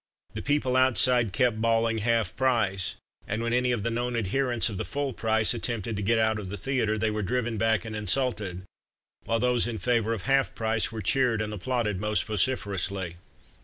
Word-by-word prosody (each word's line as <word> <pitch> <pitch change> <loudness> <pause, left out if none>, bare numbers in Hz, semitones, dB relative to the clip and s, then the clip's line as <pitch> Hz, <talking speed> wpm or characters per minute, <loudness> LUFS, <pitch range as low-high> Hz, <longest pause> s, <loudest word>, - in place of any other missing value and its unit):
The - - -4
people 140 -3 +1
outside 125 -3 +3
kept 110 +1 +1
bawling 115 0 +2
"Half 115 -3 +1
price!" 110 -8 +1 0.3
and 110 +3 -2
when 115 0 -1
any 125 0 +2
of 120 -4 -1
the 115 - -1
known 120 +1 -1
adherents 120 +2 0
of 100 -5 -5
the - - -1
full 140 -2 -3
price 110 0 +1
attempted 115 -2 -3
to 100 - -3
get 115 +3 +2
out 110 -1 +2
of 95 -3 -6
the 100 - -4
theatre 110 0 0
they 110 0 0
were 105 0 -2
driven 115 +2 -1
back 110 -1 +2
and 110 -1 -5
insulted, 105 -3 -1 0.6
while 115 - +1
those 125 0 +2
in 115 -2 -3
favour 115 +1 +1
of 105 -5 -5
"Half 135 0 +2
price" 110 0 0
were 110 -2 -5
cheered 125 +1 +2
and 105 0 -2
applauded 105 -2 -1
most 105 -3 0
vociferously. 100 -5 -2
115 Hz, 195 wpm, -27 LUFS, 105-125 Hz, 0.6 s, outside